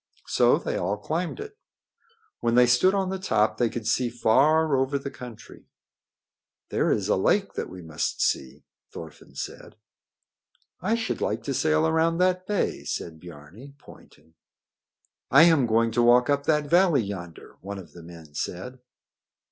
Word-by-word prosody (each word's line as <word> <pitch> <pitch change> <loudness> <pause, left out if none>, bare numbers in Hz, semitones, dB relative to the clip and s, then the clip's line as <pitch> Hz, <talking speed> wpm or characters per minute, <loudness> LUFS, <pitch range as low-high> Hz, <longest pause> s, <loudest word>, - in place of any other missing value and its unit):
So - - +3
they - - -3
all 100 +4 -1
climbed 170 - -3
it. 430 +1 -9 0.8
When 115 0 0
they 125 0 +6
stood 125 +11 +3
on 190 -1 -1
the 190 - -3
top 110 - 0
they 120 -2 +2
could 115 -1 -6
see 120 +2 +1
far 145 +6 +3
over 135 +2 0
the 140 0 -6
country. 120 -3 -12 1.0
"There - - +1
is - - 0
a - - +2
lake - - +1
that - - -4
we 90 -1 -10
must 80 -2 -3
see," 65 -2 -1 0.3
Thorfinn 80 -4 -11
said. - - -8 1.1
"I 210 +6 +1
should 230 -1 -3
like - - -2
to 140 - -3
sail 155 +3 +2
around 160 +1 +1
that 185 0 +1
bay," 205 -2 -1
said 80 -2 -5
Biarni, 90 - -13
pointing. 80 - -18 1.0
"I 140 +5 +7
am 160 -7 +4
going 115 +1 +2
to 120 - +1
walk 120 +3 +4
up 140 0 -1
that 150 -1 +2
valley 170 -6 +4
yonder," 90 -5 -9
one 100 +1 -7
of 95 - -12
the 85 - -12
men 80 -2 -13
said. 125 - -5
125 Hz, 165 wpm, -25 LUFS, 100-160 Hz, 1.1 s, I